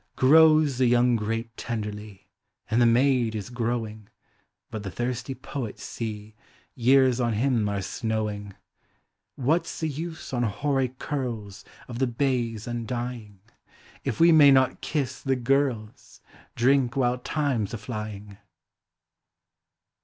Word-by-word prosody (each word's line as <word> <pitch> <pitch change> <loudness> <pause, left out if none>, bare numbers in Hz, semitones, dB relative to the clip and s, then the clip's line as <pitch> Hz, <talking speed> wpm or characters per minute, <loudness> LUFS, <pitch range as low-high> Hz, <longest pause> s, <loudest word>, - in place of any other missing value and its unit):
Grows 155 -1 +5
the 130 - +4
young 120 0 +4
grape 115 +1 -3
tenderly, 105 -3 -6 0.4
And 115 +2 +3
the 120 - +6
maid 120 -1 +3
is 105 +2 -5
growing; 115 -3 -3 0.6
But 110 - -5
the 100 - -5
thirsty 125 +4 -3
poet, 130 -3 -6
see. 110 -2 -6 0.4
Years 130 0 +4
on 120 -2 +1
him 115 -2 +1
are 100 -1 -2
snowing! 105 -2 -3 0.8
What 160 +6 +1
's - - -7
the 160 - 0
use 160 +1 -6
on 120 - 0
hoary 130 +4 0
curls 120 -10 -4 0.2
Of 120 -1 -7
the 130 - +2
bays 120 -3 -1
undying. 120 -3 -5 0.6
If - - -3
we 170 +1 +7
may 150 -3 +8
not 130 -1 +3
kiss 135 -4 -2
the 135 -1 0
girls. 125 -4 -1 0.4
Drink 130 0 +2
while 125 -2 +1
time 130 -6 -1
's - - -13
a - - -4
llying? 105 -2 -7
120 Hz, 130 wpm, -26 LUFS, 110-135 Hz, 0.8 s, may